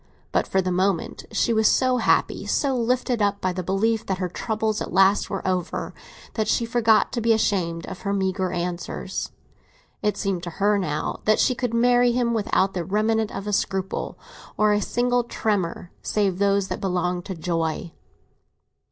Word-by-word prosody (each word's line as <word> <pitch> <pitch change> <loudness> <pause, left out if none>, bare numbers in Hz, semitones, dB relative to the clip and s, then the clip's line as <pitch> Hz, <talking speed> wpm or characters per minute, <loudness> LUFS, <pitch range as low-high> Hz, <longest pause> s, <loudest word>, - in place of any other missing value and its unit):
But - - +1
for 190 0 +1
the 185 - -1
moment 185 -1 0
she 235 - +1
was 220 -1 +4
so 255 -1 +3
happy, 235 - +1
so 275 -2 +1
lifted 245 0 0
up 200 0 +1
by 185 -2 -1
the 185 - -3
belief 210 +5 0
that 190 - -1
her 180 -1 -2
troubles 215 +3 -2
at - - -4
last 195 +1 +4
were 195 -2 -3
over, 180 -2 -2 0.4
that 220 -2 -1
she 235 - +1
forgot 230 -2 +3
to 240 - -2
be 230 0 +4
ashamed 175 -6 0
of 190 - -8
her 200 - -2
meagre 190 -1 0
answers. 175 0 -4 0.7
It 210 - 0
seemed 195 -4 -1
to 175 - -5
her 205 +1 +3
now 155 -6 -2
that 215 0 +4
she 255 - +3
could 245 -2 -2
marry 245 0 +4
him 240 -1 +1
without 195 -3 +1
the 180 - -2
remnant 215 +4 +1
of 195 - -6
a 210 - -2
scruple 190 -1 -2 0.4
or 210 0 +4
a 205 - +1
single 245 +3 +1
tremor 195 -7 -2
save 195 -3 0
those 200 -1 +2
that - - -4
belonged 180 -2 -1
to 190 - -5
joy. 165 0 -2
200 Hz, 180 wpm, -24 LUFS, 185-225 Hz, 0.7 s, was